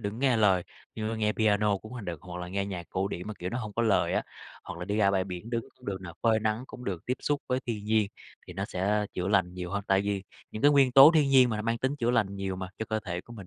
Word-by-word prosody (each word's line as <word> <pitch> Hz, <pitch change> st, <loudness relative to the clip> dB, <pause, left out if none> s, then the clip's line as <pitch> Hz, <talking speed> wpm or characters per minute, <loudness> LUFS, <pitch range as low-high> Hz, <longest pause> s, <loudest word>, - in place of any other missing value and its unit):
đừng 100 Hz, 0 st, -3 dB
có 115 Hz, -, -8 dB
nghe 130 Hz, -3 st, +3 dB
lời, 95 Hz, -5 st, +4 dB, 0.3 s
như, 110 Hz, -1 st, -3 dB
ơ, 115 Hz, -, -3 dB
nghe 105 Hz, -1 st, +1 dB
piano 105 Hz, -2 st, +2 dB
cũng 110 Hz, +4 st, -12 dB
h 125 Hz, -, -6 dB
được 85 Hz, -4 st, -5 dB
hoặc 90 Hz, 0 st, -7 dB
là 90 Hz, -, -6 dB
nghe 100 Hz, +1 st, -2 dB
nhạc 90 Hz, -4 st, -6 dB
cổ 95 Hz, +1 st, -1 dB
điển 90 Hz, +1 st, -6 dB
mà, 110 Hz, -, -5 dB
kiểu, 90 Hz, +1 st, -4 dB
nó 120 Hz, -, -2 dB
hông 110 Hz, -4 st, -5 dB
có 115 Hz, -, 0 dB
lời 110 Hz, -3 st, +2 dB
á, -, -, +1 dB, 0.4 s
hoặc -, -, -7 dB
là 90 Hz, -, -4 dB
đi 105 Hz, +2 st, -2 dB
ra 100 Hz, -2 st, +4 dB
bãi 95 Hz, -1 st, +1 dB
biển 95 Hz, +4 st, -7 dB
đứng 115 Hz, -1 st, -1 dB
cũng 125 Hz, -, -17 dB
được 95 Hz, -2 st, -3 dB
nè, 90 Hz, -2 st, -8 dB
phơi 110 Hz, -2 st, +3 dB
nắng 110 Hz, +3 st, -1 dB
cũng 125 Hz, -, -10 dB
được, 90 Hz, -4 st, -3 dB
tiếp 125 Hz, -, 0 dB
xúc 145 Hz, -1 st, -1 dB
với 125 Hz, 0 st, 0 dB
thiên 105 Hz, -4 st, -3 dB
nhiên, 110 Hz, -1 st, +2 dB, 0.4 s
thì 90 Hz, -, -8 dB
nó 95 Hz, +2 st, -3 dB
sẽ 105 Hz, +2 st, 0 dB
chữa 90 Hz, +1 st, -2 dB
lành 95 Hz, -3 st, +2 dB
nhiều 90 Hz, -1 st, -5 dB
hơn. 100 Hz, 0 st, -2 dB
Tại 95 Hz, 0 st, +3 dB
vì 100 Hz, -1 st, -2 dB, 0.3 s
những 110 Hz, -, -7 dB
cái 145 Hz, -, +7 dB
nguyên 135 Hz, -3 st, +4 dB
tố 135 Hz, +3 st, +10 dB
thiên 145 Hz, -3 st, +4 dB
nhiên 130 Hz, -2 st, +6 dB
mà 110 Hz, -, -1 dB
nó 105 Hz, -, -3 dB
mang 115 Hz, +1 st, -1 dB
tính 130 Hz, +4 st, -1 dB
chữa 120 Hz, -3 st, +1 dB
lành 105 Hz, -5 st, +1 dB
nhiều 95 Hz, -1 st, -3 dB
mà, 95 Hz, -1 st, -5 dB
cho 110 Hz, -, -2 dB
cơ 110 Hz, 0 st, -1 dB
thể 90 Hz, -4 st, -4 dB
của 120 Hz, -, -14 dB
mình, 100 Hz, -5 st, -10 dB
105 Hz, 315 wpm, -28 LUFS, 95-115 Hz, 0.4 s, tố